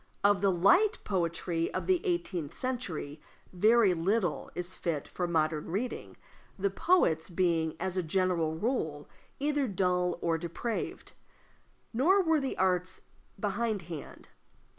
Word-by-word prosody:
Of 200 -2 +4
the 200 - +4
light 360 - +4
poetry 170 -3 -1
of - - -2
the 370 -2 +2
eighteenth 190 - -2
century 180 - -4 0.3
very 215 +1 +5
little 180 +1 0
is 180 +1 -4
fit 155 -5 -3
for 180 - -3
modern 155 -2 0
reading, 210 +9 -4 0.4
the 200 0 0
poets 190 - +2
being, 170 -3 +1
as 190 0 -2
a - - +3
general 170 -2 0
rule, 160 - -2 0.3
either 290 -1 +1
dull 180 -3 +1
or 165 -1 0
depraved. 175 +7 -4 0.8
Nor 365 - +4
were 320 -2 +3
the 270 -2 -3
arts 185 -1 0 0.4
behindhand. 200 -6 -3
185 Hz, 125 wpm, -30 LUFS, 165-235 Hz, 0.8 s, very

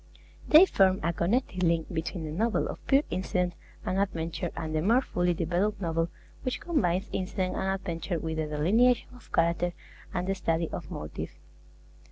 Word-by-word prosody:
They 315 +5 +9
form 190 - +3
a 170 - +1
connecting 185 +3 0
link 170 -1 +1
between 165 +1 -3
the 155 - -4
novel 215 +7 +1
of - - -7
pure 275 +1 +5
incident 180 -1 0 0.3
and 185 - 0
adventure, 170 -2 -1
and 160 -2 -4
the 155 - +1
more 235 +9 +4
fully 175 -4 0
developed 180 +6 0
novel 165 -2 0 0.3
which 255 - -2
combines 200 - 0
incident 185 0 -1
and 190 - -1
adventure 175 -1 -3
with 160 0 -3
the 155 -1 -1
delineation 210 +12 +3
of 245 - -17
character 170 +1 +2 0.4
and 180 -1 -2
the 195 - +1
study 165 -3 0
of - - -6
motive. 75 - -5
180 Hz, 170 wpm, -29 LUFS, 165-200 Hz, 0.4 s, They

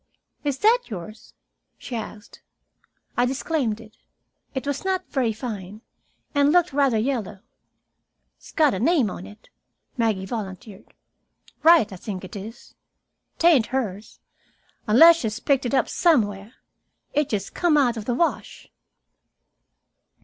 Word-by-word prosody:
"Is 285 -2 -1
that 450 - +4
yours?" 215 +1 -9 0.4
she 245 - -7
asked. 220 -1 -8 0.7
I 245 +1 +2
disclaimed 265 -4 -1
it. 220 -1 -15 0.6
It 265 - -3
was 285 0 -3
not 375 -1 -1
very 250 -5 0
fine, 210 -3 -7 0.5
and 285 0 +3
looked 350 -3 +3
rather 275 -5 +2
yellow. 215 -5 -2 1.0
"S'got 305 -6 +1
a 190 - -3
name 270 - +2
on 180 - -8
it," 210 - -17 0.5
Maggie 220 -5 0
volunteered. 200 -1 -8 0.7
"Wright, 325 - +5
I - - -8
think 190 0 -6
it 185 - -10
is. 220 +4 -10 0.6
'Tain't 315 -10 +4
hers, 220 -5 -4 0.7
unless 325 +10 +8
she's 220 -6 -3
picked 270 -2 +1
it 275 - -1
up - - +2
somewhere. 215 - +1 0.6
It's 295 -1 +1
just 200 -3 -3
come 340 -4 +2
out 250 -5 +3
of 220 -2 -6
the 245 - -1
wash." 335 +6 -2
240 Hz, 130 wpm, -23 LUFS, 210-285 Hz, 1.0 s, unless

